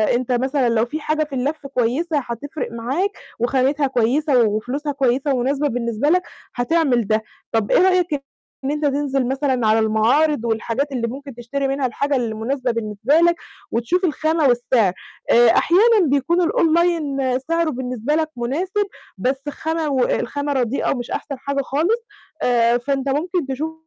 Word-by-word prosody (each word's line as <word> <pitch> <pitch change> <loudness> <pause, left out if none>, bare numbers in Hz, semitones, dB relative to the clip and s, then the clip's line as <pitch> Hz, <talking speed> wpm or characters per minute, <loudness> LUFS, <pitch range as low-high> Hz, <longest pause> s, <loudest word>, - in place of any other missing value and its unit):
أنت 255 +1 -2
مثلًا 260 +1 +1
لو 230 0 +2
في 305 +6 -5
حاجة 310 +1 0
في 295 -2 -7
اللَّف 280 +3 -2
كويسة 275 +6 0
هتفرِق 275 +4 -5
معاك، 265 - -1 0.3
وخامتها 270 +4 +1
كويسة 260 +2 +2
وفلوسها 245 +8 -1
كويسة 275 0 +1
ومناسبة 275 +4 0
بالنسبة 235 +1 -1
لك 360 +3 +4 0.3
هتعمل 245 -3 +1
ده، 215 +1 +1 0.3
طب 225 -2 0
إيه - - +5
رأيك 365 -3 +3 0.5
إن 270 - -1
أنت 300 0 -1
تنزل 275 -2 0
مثلًا 265 -3 0
على 215 +1 +4
المعارض 230 +6 +2
والحاجات 230 +5 -1
اللي 240 -3 -1
ممكن 275 +2 -8
تشتري 245 +4 -3
منها 270 0 -1
الحاجة 280 +4 -1
اللي 235 -4 -1
مُناسبة 250 +3 -1
بالنسبة 225 +2 -1
لك، 340 0 +4 0.4
وتشوف 330 - 0
الخامة 315 -1 +1
والسعر، 240 -5 +2 0.4
آآ 240 0 +6
أحيانًا 410 - +4
بيكون 285 +6 +2
الOnline 310 -6 +1
سعره 330 +5 0
بالنسبة 255 0 -2
لك 315 0 0
مُناسب، 360 +12 -1 0.3
بس 270 +3 -2
خامة 320 +1 -2
والخامة 285 +2 0
رديئة 255 -1 0
ومش 245 -3 -4
أحسن 280 - -4
حاجة 280 +1 -2
خالص، 340 - 0 0.4
آآ 235 -1 +3
فأنت 275 +2 -2
ممكن 330 +2 -1
تشوف 295 +4 -3
270 Hz, 155 wpm, -20 LUFS, 240-305 Hz, 0.5 s, آآ